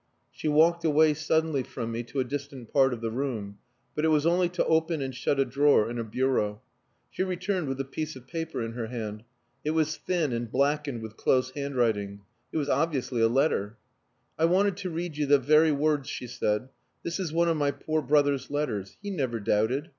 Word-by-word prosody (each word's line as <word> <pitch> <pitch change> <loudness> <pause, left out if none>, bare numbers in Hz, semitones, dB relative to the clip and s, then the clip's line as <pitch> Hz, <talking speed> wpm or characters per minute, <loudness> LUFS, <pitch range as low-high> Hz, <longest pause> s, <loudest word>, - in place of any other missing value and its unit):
She - - -5
walked 165 +3 +4
away 155 -1 +4
suddenly 155 -1 +1
from 115 -2 -5
me 115 +1 -2
to 135 - -4
a - - +3
distant 135 -2 -6
part 135 -1 +5
of 120 -2 -4
the 115 -1 -2
room; 110 -6 -3 0.3
but 150 - -2
it - - +4
was 155 -1 +3
only 175 +1 +3
to 180 - 0
open 160 0 +2
and 135 -1 -3
shut 135 +2 0
a 135 - +4
drawer 140 -6 +4
in 120 - -4
a - - -1
bureau. 110 -3 0 0.5
She - - -4
returned 185 -2 -1
with 135 0 -3
a 135 - -1
piece 155 +3 -4
of 130 -1 -12
paper 165 -3 -4
in 115 - -4
her 115 -1 -4
hand. 110 -3 -5 0.4
It 155 +1 -1
was 155 0 +1
thin 165 -8 -1
and 115 -1 -3
blackened 140 -4 0
with 110 0 -9
close 130 0 +2
handwriting. 115 -8 -1 0.3
It - - -2
was 145 -2 0
obviously 140 -6 0
a 115 - +6
letter. 115 -4 +1 0.6
"I 160 - +4
wanted 190 +3 +3
to 190 -2 -4
read 170 -2 -4
you 150 -1 0
the 145 +1 +6
very 155 +4 +4
words," 145 -1 +1
she 125 - -5
said. 120 0 -1 0.3
"This 170 +2 -3
is 180 -5 -2
one 170 +1 +2
of 165 -1 +2
my 145 -1 +2
poor 155 +2 -1
brother's 145 -1 +2
letters. 125 -10 -3
He 205 - -4
never 130 -10 -1
doubted. 110 - 0
140 Hz, 210 wpm, -28 LUFS, 120-160 Hz, 0.6 s, a